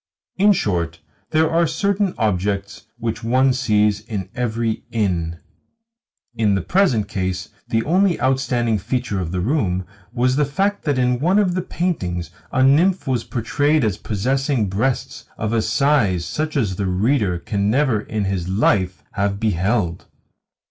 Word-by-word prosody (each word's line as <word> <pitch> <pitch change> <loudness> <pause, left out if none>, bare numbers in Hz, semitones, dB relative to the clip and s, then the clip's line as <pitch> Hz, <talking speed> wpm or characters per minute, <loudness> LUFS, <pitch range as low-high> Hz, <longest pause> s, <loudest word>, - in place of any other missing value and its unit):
In 205 +2 +5
short, 85 - -1 0.3
there 160 +1 +3
are 165 +1 +2
certain 200 +2 0
objects 100 0 -1
which 115 -1 -3
one 130 +3 +3
sees 105 -5 +2
in 105 -4 -5
every 115 -2 -1
inn. 90 -7 -1 1.0
In 110 -4 +2
the 95 - -1
present 130 - +2
case 95 -3 -3 0.2
the 115 0 0
only 180 +3 +2
outstanding 125 -4 +1
feature 120 -1 -2
of 85 -3 -3
the 90 -1 -1
room 95 - 0 0.3
was 125 +1 +1
the 150 - +3
fact 195 +9 -1
that 145 -3 +1
in 125 -1 +1
one 180 +8 +2
of 195 -4 +3
the 185 - 0
paintings 90 - -2 0.2
a 130 - +2
nymph 170 +8 +4
was 125 -4 0
portrayed 145 +6 +1
as 105 -3 0
possessing 130 +2 0
breasts 120 +7 -2
of 110 +1 -2
a 115 - +2
size 110 - +2
such 155 -1 -2
as 100 -8 0
the 100 - -1
reader 100 0 +1
can 100 +3 -1
never 130 -2 +2
in 110 -1 -3
his 95 -2 -2
life 95 -2 +1
have 100 0 -1
beheld. 100 -3 0
115 Hz, 155 wpm, -21 LUFS, 100-140 Hz, 1.0 s, In